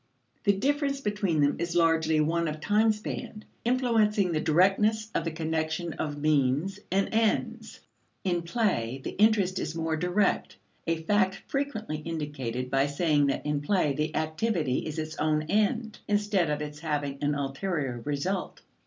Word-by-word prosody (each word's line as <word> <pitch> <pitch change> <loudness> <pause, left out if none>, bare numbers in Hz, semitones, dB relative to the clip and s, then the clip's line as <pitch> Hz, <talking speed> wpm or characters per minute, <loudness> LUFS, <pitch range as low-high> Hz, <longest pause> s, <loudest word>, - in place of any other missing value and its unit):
The 200 - +5
difference 280 +4 0
between 205 - 0
them 145 0 +2
is 170 0 -2
largely 165 -2 +3
one 165 +2 +1
of 155 0 -4
time 215 +6 +3
span, 215 0 -6 0.2
influencing 225 -6 +2
the 155 -2 0
directness 210 +6 +3
of 165 - -1
the 165 - -1
connection 160 +1 -2
of 145 -1 -4
means 150 +5 +1
and 195 +1 +2
ends. 225 -1 0 0.4
In 175 -2 0
play, 170 - -1
the - - -3
interest 205 -3 +3
is 160 - -3
more 160 -1 -1
direct 180 +5 0 0.3
a 165 -1 -1
fact 195 +1 +1
frequently 230 - -2
indicated 145 -6 -4
by 135 +1 +3
saying 145 -1 +2
that 140 - -1
in 150 -1 0
play 150 -3 +1
the 150 +2 -2
activity 155 - 0
is 155 0 -5
its 155 0 -4
own 155 0 +1
end, 215 - 0
instead 205 -5 +1
of 150 0 -1
its 150 0 -7
having 145 -3 -2
an 145 0 +1
ulterior 140 -2 -2
result. 165 +7 -3
165 Hz, 155 wpm, -28 LUFS, 150-205 Hz, 0.4 s, The